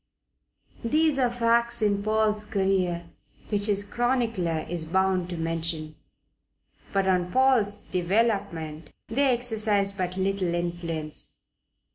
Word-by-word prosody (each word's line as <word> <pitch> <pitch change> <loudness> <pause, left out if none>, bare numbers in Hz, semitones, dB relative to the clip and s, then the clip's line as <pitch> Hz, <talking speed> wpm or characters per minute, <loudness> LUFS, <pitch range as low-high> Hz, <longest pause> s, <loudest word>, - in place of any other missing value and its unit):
These 300 +3 +2
are 250 -2 +3
facts 235 0 +3
in 200 -1 +2
Paul's 215 0 +1
career 185 -4 0 0.4
which 205 -1 +2
his 200 -1 +1
chronicler 225 -7 0
is 165 -2 -4
bound 190 0 +1
to 175 - -4
mention. 165 -1 -2 1.0
But 195 -1 +1
on 180 -1 +1
Paul's 230 -6 +2
development 175 -5 -1 0.2
they 270 +6 +2
exercised 215 -5 0
but 185 0 -2
little 190 -2 0
influence. 170 -3 -4
195 Hz, 110 wpm, -26 LUFS, 175-225 Hz, 1.0 s, are